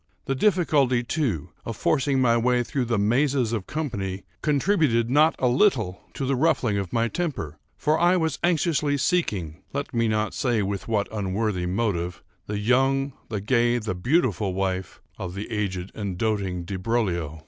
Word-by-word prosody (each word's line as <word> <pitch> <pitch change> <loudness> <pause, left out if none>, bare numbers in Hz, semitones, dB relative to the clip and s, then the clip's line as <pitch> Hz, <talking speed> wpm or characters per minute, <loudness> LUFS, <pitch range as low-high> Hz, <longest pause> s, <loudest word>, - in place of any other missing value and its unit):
The 135 - 0
difficulty, 140 - +2
too, 120 - -2
of 115 -2 -5
forcing 135 -1 +1
my 120 -2 +4
way 120 +1 +2
through 130 +1 -2
the 115 -1 0
mazes 120 +3 +2
of 105 -5 -3
the - - -14
company 100 -12 -3 0.2
contributed 145 - +2
not 155 +4 +5
a 130 - +1
little 120 - +2
to 135 - -2
the 135 +1 +1
ruffling 130 -8 +2
of 95 -3 -4
my 115 0 +1
temper; 115 - -3 0.2
for 155 +1 +1
I 175 +2 +4
was 160 -4 -1
anxiously 155 -4 +2
seeking, 100 - -1
(let 140 0 -3
me 115 -1 +2
not 110 0 0
say 120 -5 +1
with 100 0 -3
what 105 -3 0
unworthy 100 -2 -1
motive) 90 -3 -1 0.2
the 105 - -2
young, 135 +5 +2 0.2
the 105 -4 -3
gay, 120 +2 +2
the 110 -3 -3
beautiful 105 - +1
wife 95 -3 -3 0.2
of 90 -1 -5
the 100 +4 -6
aged 95 -4 -2
and 100 -4 -4
doting 100 -5 -1
Di 95 +2 -5
Broglio. 90 -7 -1
115 Hz, 170 wpm, -25 LUFS, 100-135 Hz, 0.2 s, not